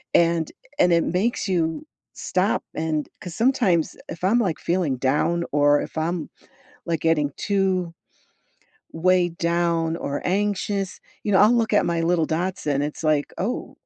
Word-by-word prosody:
and 170 -1 +3 0.3
and 180 - +5
it 170 -1 +4
makes 210 +7 0
you 170 - -1 0.3
stop - - 0
and 155 -2 -1
'cause 175 -2 -7
sometimes, 220 - +2
if 165 - -8
I'm, 210 +6 +3
like, 185 -9 -1
feeling 170 -7 0
down, 150 +7 +1
or 145 0 +4
if - - -8
I'm, 165 +2 -2 0.6
like, 165 -2 -1
getting 150 -3 +2
too 190 -4 0 1.0
weighed 175 0 +2
down 170 -1 0
or 140 -3 -3
anxious, 200 0 -1 0.2
you 210 - -1
know, 190 - +5
I'll 210 +4 +6
look 230 -2 +1
at 210 - +4
my 170 -1 0
little 165 -1 +2
dachshund, 160 -4 -1
it's 150 +2 -5
like, 150 -2 +1
"Oh." 215 +7 -3
170 Hz, 150 wpm, -23 LUFS, 160-190 Hz, 1.0 s, I'll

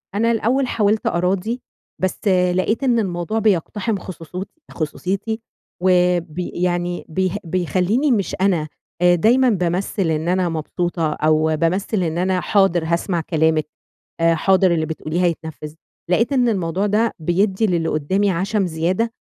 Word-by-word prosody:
أنا 230 +2 +2
الأول 245 +4 +1
حاولت 215 -2 +1
أراضِي، 190 +7 0 0.4
بس 185 -1 -1
آآ 180 -1 +3
لقيت 220 +8 0
إن 240 -3 +3
الموضوع 185 +2 -2
بيقتحِم 210 +2 0
خصوصيتي- 180 +1 -7 0.2
خصوصيتي، 195 +7 -3 0.4
وآآ 180 -1 +4
بي 170 +1 -6
يعني 175 0 -2
بي 185 +2 0
بيخلّيني 185 - 0
مش 200 -5 0
أنا، 180 -6 +2 0.3
آآ 175 0 +5
دايمًا 245 +8 +4
بامَثِّل 180 -2 0
إن 160 +2 -1
أنا 180 -1 +1
مبسوطة، 165 0 -2
أو 155 +1 +2
بامَثِّل 185 +4 0
إن 165 -1 -2
أنا 185 +1 +1
"حاضر 195 -5 +2
هاسمع 170 +1 0
كلامِك 160 -1 +1 0.5
آآ، 165 0 +4
حاضر 185 +1 +3
اللي 160 -1 0
بتقوليه 160 +2 -3
هيتنفِّذ." 160 -2 -3 0.4
لقيت 230 +9 +2
إن 250 -3 +3
الموضوع 190 -2 0
ده 220 +3 +1
بيدِّي 190 +6 +1
للي 170 -4 0
قُُدّامي 190 +8 +1
عشم 195 +3 0
زيادة، 180 +8 -1
180 Hz, 145 wpm, -20 LUFS, 165-205 Hz, 0.5 s, آآ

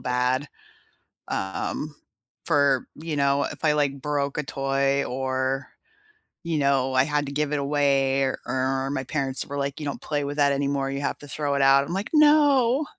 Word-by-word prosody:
bad, 125 +3 0 0.8
um, 120 +10 -3 0.5
for, 140 -5 +2
you 160 0 -5
know, 140 0 +2
if - - -6
I, 150 - +4
like, 140 -2 0
broke 145 -1 -1
a 150 - -1
toy 135 0 0
or, 130 +1 -2 0.8
you 165 -2 -1
know, 135 -2 +1
I 130 0 +4
had 150 0 -1
to - - -5
give 150 0 -1
it 145 - 0
away 140 -1 +2
or 130 -1 -1
or 130 +1 -1
my 135 -1 -2
parents 135 -3 -2
were 145 - -6
like, 140 +1 -3
"You 150 - -5
don't 140 - -4
play 145 -1 -2
with 145 +1 -4
that 145 -1 +4
anymore, 140 -1 -1
you 140 +1 -3
have 140 - -2
to 145 - -12
throw 145 0 -2
it 140 - +1
out," 135 0 +5
I'm 170 - -5
like, 195 +3 -3
"No." 295 -3 +4
140 Hz, 190 wpm, -25 LUFS, 135-150 Hz, 0.8 s, out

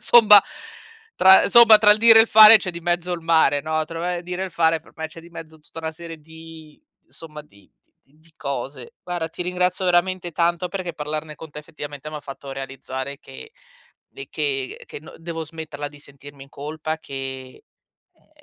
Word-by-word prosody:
insomma, 210 -4 +6 0.7
tra 190 0 +6
insomma, 225 0 +7
tra 210 -1 +6
il 210 - -1
dire 225 0 +8
e - - +8
il 225 - -4
fare 215 +1 +9
c'è 185 - -5
di 170 -1 -9
mezzo 175 +1 -2
il 175 - -5
mare, 160 -4 +2
no, 155 0 -3
tro 165 +1 -8
uhm, 175 +1 -3
il 175 - -9
dire 180 +1 -6
e - - -2
il - - -11
fare 160 -1 +1
per - - -22
me 160 0 -6
c'è 165 - -14
di 170 +1 -17
mezzo 160 -2 -12
tutta 150 +1 -15
una 160 0 -5
serie 165 0 -11
di 160 0 -15 0.3
insomma, 150 -2 -12
di 100 -9 -24 0.4
di 155 +2 -26
cose. 135 -1 -7
Guarda, 175 -2 -4
ti 165 - -7
ringrazio 180 +1 -2
veramente 180 0 0
tanto 170 +2 -1
perché 180 -1 -6
parlarne 150 +1 -6
con 160 0 -13
te, 150 - -9
effettivamente, 145 -1 -10
m'ha 155 -1 -8
fatto 140 0 -10
realizzare 135 0 -7
che 450 - -14 0.6
de 405 0 -12
che, 405 -1 -2
uhm, - - -15
che 445 - -10
n - - -15
devo 165 -1 -7
smetterla 155 -2 -8
di 145 0 -18
sentirmi 140 0 -15
in 140 - -22
colpa, 155 +4 -6
che 135 -3 -9 0.5
uhm, - - -35
160 Hz, 200 wpm, -21 LUFS, 150-180 Hz, 0.7 s, fare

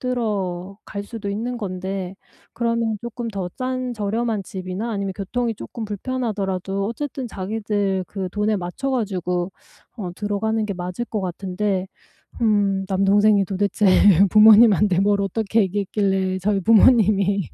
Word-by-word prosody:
들어갈 200 -4 -3
수도 210 -2 -6
있는 235 +4 -3
건데 190 -2 -4 0.4
그러면 230 -2 0
쪼끔 235 0 -5
더 195 -4 -4
싼 255 -1 -2
저렴한 215 0 -1
집이나 190 +5 -5
아니면 200 -2 -2
교통이 230 +4 -2
쪼끔 225 +2 -7
불편하더라도 200 -4 -3
어쨌든 260 +1 -4
자기들 200 -1 -2
그 190 -3 -4
돈에 210 +1 0
맞춰 185 +10 -4
가지고 185 -6 -2 0.4
어 185 -5 -5
들어가는 215 +1 -1
게 200 - -2
맞을 180 +6 -4
것 215 -3 -4
같은데 190 +1 -2 0.5
음 200 -3 +2
'남동생이 200 +1 +3
도대체 200 +2 0 0.4
부모님한테 210 -3 +6
뭘 200 0 +2
어떻게 220 +3 0
얘기했길래 190 -1 0
저희 200 +1 +1
부모님이 205 -2 +4
205 Hz, 310 characters per minute, -22 LUFS, 190-225 Hz, 0.5 s, 부모님한테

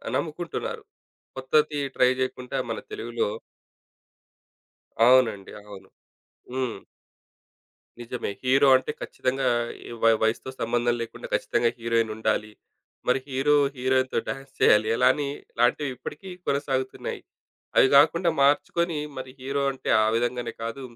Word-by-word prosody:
నమ్ముకుంటున్నారు. 170 +1 -4 0.5
కొత్తది 150 +3 +1 0.2
ట్రై 125 - +5
చేయకుండా 130 0 -3
మన - - -3
తెలుగులో 425 +2 -2 1.8
అవునండి. 120 -6 +3
అవును. 100 -2 -13 0.6
హ్మ్. 130 -4 -2 1.2
నిజమే. 120 -1 -4
హీరో 135 +2 +4
అంటే 130 +3 -3
ఖచ్చితంగా 130 +1 -1 0.4
ఈ - - -9
వయ్ 115 -1 +5
వయసుతో 110 +4 0
సంబంధం 120 +1 +1
లేకుండా 115 - -8
ఖచ్చితంగా 120 - +1
హీరోయినుండాలి. 110 -2 0 0.6
మరి 125 - +4
హీరో 135 +2 +2 0.2
హీరోయిన్‌తో 130 +1 +1
డాన్స్ 135 0 -6
చేయాలి. 105 0 +5
ఎలాని 130 +4 +3 0.3
లాంటివి 135 +4 +2
ఇప్పటికి 145 +8 -8 0.2
కొనసాగుతున్నాయి. 135 -2 -2 0.6
అవి - - +7
గాకుండా 170 +5 +5
మార్చుకొని, 155 +3 +2 0.2
మరి 130 0 -6
హీరో 140 +2 -2
అంటే 130 - -5
ఆ - - +2
విధంగానే 120 +1 -1
కాదు, 115 +4 -5
130 Hz, 110 wpm, -25 LUFS, 120-140 Hz, 1.8 s, అవి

